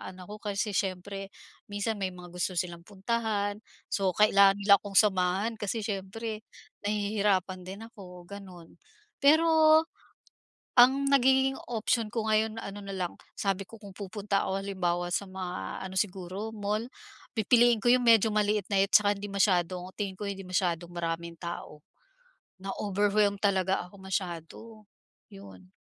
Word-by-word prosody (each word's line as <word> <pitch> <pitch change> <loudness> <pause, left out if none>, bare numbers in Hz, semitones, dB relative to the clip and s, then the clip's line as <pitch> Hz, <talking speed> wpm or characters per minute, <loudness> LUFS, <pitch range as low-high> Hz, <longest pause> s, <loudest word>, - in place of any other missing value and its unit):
anak 185 -1 -11
ko, 210 - -7
kasi 205 0 -2
siyempre 195 0 -3 0.4
minsan 205 +2 -2
may 185 -1 -2
mga 175 -1 -11
gusto 180 +1 -2
silang 170 -1 -3
puntahan, 205 0 -2 0.3
so 190 -2 +1
kailangan 200 -2 +6
nila 200 -1 +6
akong 200 -1 -9
samahan 195 +2 +2
kasi 215 +2 -2
siyempre, 215 +2 -4 0.4
nahihirapan 200 -3 0
din 195 +3 -7
ako, 180 -6 -12
gano'n. 185 -5 -11 0.4
Pero 315 +1 +6 0.9
ang 270 +3 +6
nagigiging 265 0 +4 0.2
option 225 0 0
ko 225 -2 -2
ngayon 215 +1 +1
ano 200 -1 -7
na 195 - -7
lang, 180 -2 -3 0.3
sabi 195 -1 0
ko, 225 +2 -14
kung 200 -2 -11
pupunta 200 0 -2
ako 195 +1 -1
halimbawa 175 -3 -1
sa - - -1
mga 180 - -5
ano, 190 - -10
siguro 190 +2 -3
mall, 210 +2 -2 0.5
pipiliin 235 +1 +4
ko - - -1
yung 250 0 +4
medyo 225 -1 +6
maliit-liit 205 -1 +1
tsaka 205 -1 +5
hindi 205 +1 -6
masyadong 185 -2 +1
tingin 195 -3 -3
ko, 205 - -4
hindi 195 -1 -5
masyadong 175 -2 -1
maraming 170 0 -4
tao. 170 -3 -7 0.8
Na-overwhelmed 200 +1 +1
talaga 190 -2 +1
ako 200 +3 -16
masyado. 180 -4 -4 0.7
Yun. 95 -2 -13
200 Hz, 140 wpm, -29 LUFS, 185-215 Hz, 0.9 s, kailangan